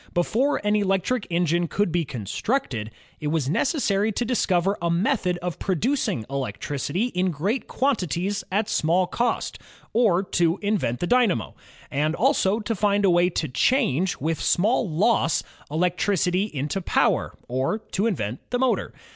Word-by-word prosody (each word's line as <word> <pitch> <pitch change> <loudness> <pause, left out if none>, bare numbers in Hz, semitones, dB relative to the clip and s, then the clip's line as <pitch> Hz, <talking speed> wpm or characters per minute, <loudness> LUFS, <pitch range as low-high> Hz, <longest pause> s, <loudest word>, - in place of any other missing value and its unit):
Before 240 +11 +1
an 210 0 +3
electric 200 +3 0
engine 170 0 +1
could 200 +3 0
be 170 -1 0
constructed, 120 - -2 0.3
it 150 - -3
was 150 -3 0
necessary 215 - +1
to 240 - -1
discover 195 -5 +1
a 170 - 0
method 180 0 +1
of 180 -2 -4
producing 195 - 0
electricity 140 - -2
in 185 +1 +1
great 190 - -2
quantities 200 - -1
at 205 +2 +1
small 175 0 +2
cost, 235 +6 -2 0.3
or 210 -6 +3
to 170 -2 +1
invent 200 - 0
the - - +1
dynamo; 230 - +2 0.4
and 150 +3 0
also 195 +5 +2
to 220 +2 -2
find 205 -1 +2
a 190 - +5
way 175 +1 +4
to 165 -2 -2
change, 185 - +1
with 160 +3 -2
small 215 +3 +2
loss, 165 +1 +2 0.3
elec 175 +4 0
tricity 190 +1 +1
into 150 +5 -3
power, - - +1
or 130 - 0
to 220 -1 -2
invent 120 - -2
the 245 - 0
motor. 260 0 0
185 Hz, 150 wpm, -24 LUFS, 160-215 Hz, 0.4 s, a